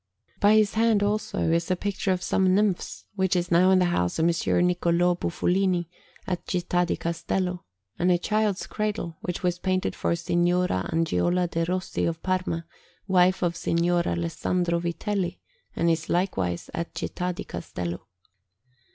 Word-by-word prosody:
By 205 +1 +5
his 215 -2 +3
hand, 220 -2 +3
also, 210 -4 0
is 170 0 +1
a 185 - +2
picture 195 +1 -2
of 185 0 -1
some 185 -1 +2
nymphs, 205 -3 0
which 190 -2 +1
is 175 -1 -1
now 175 +2 +5
in 190 - +5
the 180 - +4
house 90 - 0
of 160 - +2
Messer 170 0 +2
Niccolò 175 0 +2
Bufolini 180 0 +1 0.4
at 180 -2 -3
Città 175 -1 0
di - - -1
Castello, 175 +2 -2 0.3
and 180 +1 +3
a 175 - +4
child's 210 +1 0
cradle, 210 -6 -3
which 180 0 -4
was 180 -1 0
painted 185 0 -1
for - - 0
Signora 175 - +1
Angiola 165 - +1
de' 165 0 -1
Rossi 185 +2 -2
of 165 -1 -3
Parma, 185 -3 -1 0.4
wife 185 -1 +3
of 170 -1 +1
Signor 170 +1 +1
Alessandro 170 - 0
Vitelli, 175 +2 -2 0.4
and 170 - +1
is 160 -1 0
likewise 95 - -1
at 170 - -4
Città 180 0 -3
di - - -5
Castello. 90 +1 -6
180 Hz, 160 wpm, -26 LUFS, 170-185 Hz, 0.4 s, By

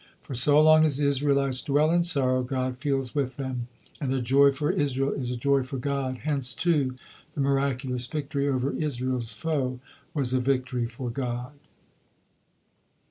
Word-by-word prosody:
For - - -9
so 145 +4 +4
long 155 0 +6
as 150 -4 +3
the 145 - +1
Israelites 140 -2 +2
dwell 150 +2 +2
in 175 0 +3
sorrow, 135 -7 +1
God 130 0 -3
feels 135 -3 -1
with 135 -3 -2
them, 130 -3 -4 0.3
and 135 -4 -2
a 135 - +1
joy 135 +3 +4
for 145 +2 -1
Israel 135 -1 0
is 125 -3 -3
a 125 - -3
joy 140 +2 +2
for 130 +1 -5
God, 130 -2 -2
hence, 135 -4 -1
too, 145 -7 +1 0.4
the - - -5
miraculous 135 -2 0
victory 140 -1 -2
over 130 0 0
Israel's 130 -5 -2
foe 130 -1 -2 0.4
was 130 -4 0
a 130 - +3
victory 125 -2 0
for 120 +1 -6
God. 125 +1 -4
135 Hz, 165 wpm, -26 LUFS, 125-145 Hz, 0.4 s, long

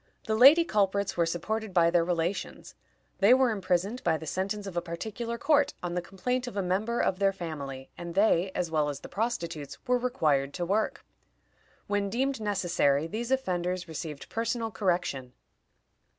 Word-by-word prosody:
The 220 - 0
lady 280 +9 +8
culprits 200 - +1
were 170 -1 +2
supported 210 +4 -3
by 170 -1 +5
their 170 -1 +4
relations. 175 +2 -3 0.5
They 205 +6 +7
were 260 -2 +3
imprisoned 195 +3 -1
by 160 - +2
the 160 - -9
sentence 195 +5 -2
of 195 -3 -7
a 175 - +1
particular 220 +8 -5
court, 290 +2 +2
on 175 -1 -2
the 180 - -1
complaint 250 +8 -3
of 230 - -6
a 200 - +1
member 210 +6 0
of 185 - +1
their 195 -1 +3
family, 145 -8 -7
and 170 -1 -6
they, 195 -2 +3
as 175 -2 -1
well 150 -2 +1
as 140 -1 -5
the - - -10
prostitutes, 170 - -3
were 250 0 +2
required 150 - +1
to 175 - -2
work. 210 +5 -1 0.8
When 205 -1 -1
deemed 260 +2 -1
necessary, 175 -8 +1
these 220 +7 -4
offenders 180 -8 -1
received 155 -2 -6
personal 230 0 -2
correction. 170 - -1
190 Hz, 170 wpm, -28 LUFS, 170-225 Hz, 0.8 s, lady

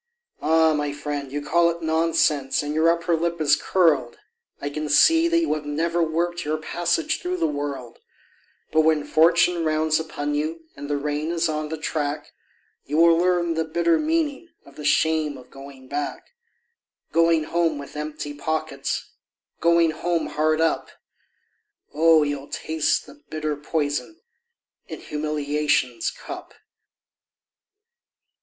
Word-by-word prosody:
Ah! 160 +1 +4
my 150 -1 -1
friend, 145 -1 -5
you 145 +1 -3
call 170 +3 +3
it 170 0 -5
nonsense, 160 -4 +1
and 145 0 -3
your 160 +2 +3
upper 170 0 +1
lip 170 +1 -2
is 145 -2 +4
curled, 145 -8 +1 0.4
I 145 - -4
can 150 +1 -4
see 325 - +5
that 335 0 +2
you 335 -1 +1
have 155 -1 -5
never 165 +3 0
worked 170 +2 -1
your 155 +1 -1
passage 165 +1 -1
through 180 +1 -2
the 165 - +1
world; 145 -5 -4 0.7
But 155 - +4
when 155 -1 +2
fortune 170 +2 +3
rounds 155 0 +1
upon 145 -2 -4
you 155 +3 -2
and 145 +1 -8
the 145 - 0
rain 150 +2 -2
is 170 0 0
on 155 -1 -3
the 160 - -4
track, 150 -1 -3 0.6
You 150 - -1
will 165 0 +6
learn 175 -1 +1
the 160 0 0
bitter 165 +1 +1
meaning 320 0 -1 0.2
of 140 - -17
the 150 - -9
shame 155 0 +2
of 125 - -15
going 135 -1 -12
back; 145 +2 -5 0.8
Going 165 -1 +3
home 165 -1 0
with 140 +1 -9
empty 150 -1 -5
pockets, 155 -1 -3 0.5
Going 170 -1 +4
home 170 +1 -1
hard 155 +1 +1
up; 165 0 0 1.0
Oh, 160 0 +5
you'll 145 -1 -4
taste 160 -1 -1
the 295 - -16
bitter 155 -1 -2
poison 150 - -3 0.7
in - - -7
humiliation's 150 -5 -1
cup. - - -9
155 Hz, 145 wpm, -23 LUFS, 145-165 Hz, 1.0 s, will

